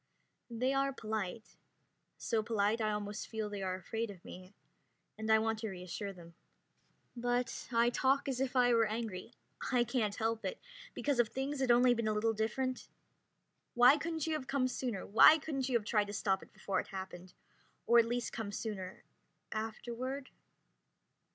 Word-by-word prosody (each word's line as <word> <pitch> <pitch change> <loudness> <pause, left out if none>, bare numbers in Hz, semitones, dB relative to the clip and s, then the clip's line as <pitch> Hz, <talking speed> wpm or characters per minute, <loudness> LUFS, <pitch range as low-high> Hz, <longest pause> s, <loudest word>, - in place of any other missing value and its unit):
They 250 +3 0
are 275 0 +2
polite, 220 -3 -5 0.6
so 225 -2 0
polite 215 0 +1
I 215 - +1
almost 210 0 -3
feel 220 -2 -4
they 205 -1 -4
are 185 -1 -1
afraid 225 +5 -4
of 190 -4 -11
me, 185 +2 -11 0.6
and 220 0 -2
I 220 - +7
want 220 0 0
to 220 -1 -3
reassure 190 +2 -5
them. 170 -3 -13 0.8
But 245 0 -1
I 235 0 +3
talk 270 +3 +2
as 260 -1 -1
if 265 -1 -1
I 245 -1 +5
were 230 -1 +4
angry. 220 -2 -5 0.4
I 245 -2 +4
can't 230 -4 -1
help 225 0 -1
it, 475 - -3 0.4
because 285 -4 0
if 240 - +5
things 270 +5 -3
had 265 -2 0
only 245 +1 +6
been 230 -2 -1
a 215 - +2
little 225 +1 +1
different... 245 +4 -2 0.9
"Why 245 +3 +8
couldn't 320 0 -2
you 320 - -1
have 295 -4 -3
come 270 -2 +1
sooner? 245 -5 -3
Why 270 +9 +8
couldn't 275 -3 -3
you 245 - +4
have 215 - -7
tried 210 -1 +2
to 205 - -6
stop 195 -2 0
it - - -15
before 195 0 -2
it - - -4
happened, 185 -2 -8 0.5
or 235 0 +6
at 230 - +5
least 240 +1 -2
come 220 -3 -4
sooner, 200 -3 -5 0.5
afterward...?" 240 +5 -4
225 Hz, 175 wpm, -34 LUFS, 210-255 Hz, 0.9 s, Why